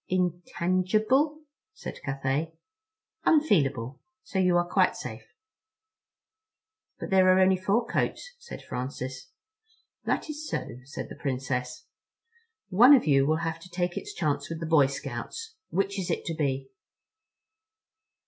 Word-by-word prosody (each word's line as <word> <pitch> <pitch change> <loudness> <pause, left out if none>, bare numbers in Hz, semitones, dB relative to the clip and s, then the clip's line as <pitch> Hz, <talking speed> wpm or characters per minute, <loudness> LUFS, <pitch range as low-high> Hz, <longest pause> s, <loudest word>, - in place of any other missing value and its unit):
"Intangible?" 185 - +1 0.3
said - - -8
Cathay. 135 +4 -1 0.7
"Unfeelable, 145 - +2 0.2
so 190 - -3
you're 180 -2 +4
quite 175 - +2
safe." - - -8 1.6
"But - - -6
there 190 -1 +5
are 185 0 +6
only 190 0 +5
four 200 +6 +1
coats," - - -2
said 475 - -9
Francis. 130 0 -5 0.8
"That - - 0
is 305 0 -6
so," 120 - -4
said 140 - -6
the - - -8
Princess. 125 -2 -3 0.8
"One 245 +10 +8
of 260 - +2
you 135 -2 +4
will 155 +1 +1
have 165 0 -3
to 180 - -13
take 175 0 -2
its 415 +1 -5
chance 145 -2 -1
with 165 -1 -4
the 165 - -4
Boy 155 -4 +5
Scouts. 450 - -6 0.2
Which 195 +1 0
is 185 - -3
it - - -1
to 165 - -2
be?" 135 -4 -2
175 Hz, 130 wpm, -28 LUFS, 140-195 Hz, 1.6 s, One